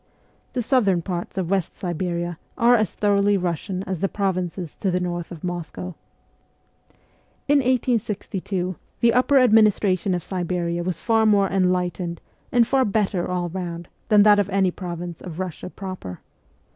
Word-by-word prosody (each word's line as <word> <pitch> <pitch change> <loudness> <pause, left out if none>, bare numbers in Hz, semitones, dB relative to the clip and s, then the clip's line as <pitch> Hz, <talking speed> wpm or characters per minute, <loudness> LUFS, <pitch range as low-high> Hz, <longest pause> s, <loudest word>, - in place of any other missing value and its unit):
The 245 - -1
southern 205 -9 +2
parts 175 0 -4
of 185 -1 -1
West 190 -4 -1
Siberia 175 -1 -3 0.2
are 240 -1 +5
as 215 -3 +3
thoroughly 205 -1 +2
Russian 180 +1 -2
as 190 -3 -4
the 195 - 0
provinces 185 -4 -2
to 195 - -1
the 180 0 +1
north 175 -1 -3
of 165 -3 -9
Moscow. 175 0 -5 1.5
In 290 0 +5
1862 210 - -1 0.2
the 235 -1 +4
upper 255 +3 +4
administration 210 -6 +4
of 175 - -3
Siberia 175 -2 -2
was 180 0 -2
far 225 -1 +2
more 200 -2 +3
enlightened 180 -2 0 0.3
and 240 -1 +5
far 265 +2 +2
better 200 -4 0
all 180 -1 -1
round 175 -1 -5 0.2
than 210 -2 +6
that 205 -1 +6
of 200 -1 +1
any 190 -2 +2
province 175 -2 -6
of 170 -4 -8
Russia 185 -2 -5
proper. 185 - -7
185 Hz, 150 wpm, -23 LUFS, 175-210 Hz, 1.5 s, than